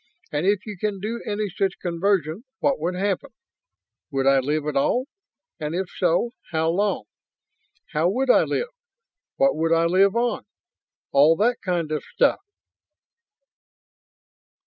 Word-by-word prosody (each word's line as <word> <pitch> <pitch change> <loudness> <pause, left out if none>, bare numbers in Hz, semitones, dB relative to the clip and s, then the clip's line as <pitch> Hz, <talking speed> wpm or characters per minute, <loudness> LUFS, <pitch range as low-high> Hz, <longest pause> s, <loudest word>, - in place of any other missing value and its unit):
And 150 +5 -1
if 200 -1 +1
you 210 -4 -7
can 205 -1 -2
do 225 +4 -4
any 210 0 -1
such 195 0 -1
conversion, 175 +1 0
what 280 -1 +1
would 175 +3 -2
happen? 200 +8 -1 0.8
Would 135 -3 -1
I 135 0 +5
live 150 +3 -1
at 150 -2 -2
all? 245 - +2 0.5
And 155 +2 -3
if 185 0 -3
so, 180 +6 +1 0.2
how 160 0 +1
long? 200 +2 0 0.9
How 160 +3 +2
would 255 +6 +2
I - - +6
live? 485 - -1 0.7
What 275 0 +3
would 165 +1 0
I 165 0 +4
live 190 +4 +4
on? 235 -2 0 0.6
All 150 +4 +6
that 235 +6 +1
kind 175 -4 -1
of 155 - -2
stuff." - - +2
185 Hz, 145 wpm, -24 LUFS, 160-210 Hz, 0.9 s, I